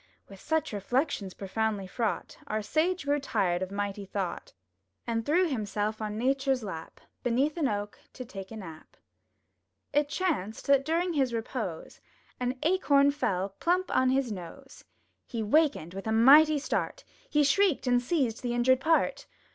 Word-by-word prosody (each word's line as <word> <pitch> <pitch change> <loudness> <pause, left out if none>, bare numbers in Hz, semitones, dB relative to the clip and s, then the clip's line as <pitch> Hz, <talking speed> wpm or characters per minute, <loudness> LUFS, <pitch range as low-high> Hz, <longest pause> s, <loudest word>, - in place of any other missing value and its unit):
*' - - -44
With 195 -1 -12
such 315 -2 -1
reflections 205 - -1
proudly 205 0 -2
fraught. 215 +3 -3
Our 215 0 -2
Sage 320 - 0
grew 290 +1 +2
tired 195 -10 0
of 185 - -2
mighty 200 0 -3
thought, 190 -2 -4 0.5
And 230 -1 -1
threw 350 +8 +3
himself 215 -4 -2
on 210 0 -3
Nature's 265 +1 +1
lap, 165 -6 -7 0.2
Beneath 265 +5 +1
an 320 -5 +1
oak, 205 -2 -3
to 255 - -7
take 195 -4 -8
a 225 - -8
nap. 165 -6 -11 1.0
It 290 0 +2
chanced 290 - -2
that 275 -1 +4
during 340 +3 0
his 265 -5 +1
repose. 220 -7 -5 0.4
An 250 +1 -1
Acorn 285 -5 +4
fell 200 -9 -1
plump 360 +2 +1
on 260 0 +4
his 260 -2 +1
nose! 205 +9 -9 0.4
He 230 -3 -3
wakened 250 - +2
with 195 +3 -6
a - - 0
mighty 290 +7 +7
start; - - -2 0.3
He 295 0 +3
shrieked 340 +2 +3
and 245 -1 +3
seized 250 -4 0
the 240 -1 -2
injured 255 +2 +4
part! 320 +4 +1
245 Hz, 160 wpm, -29 LUFS, 205-290 Hz, 1.0 s, mighty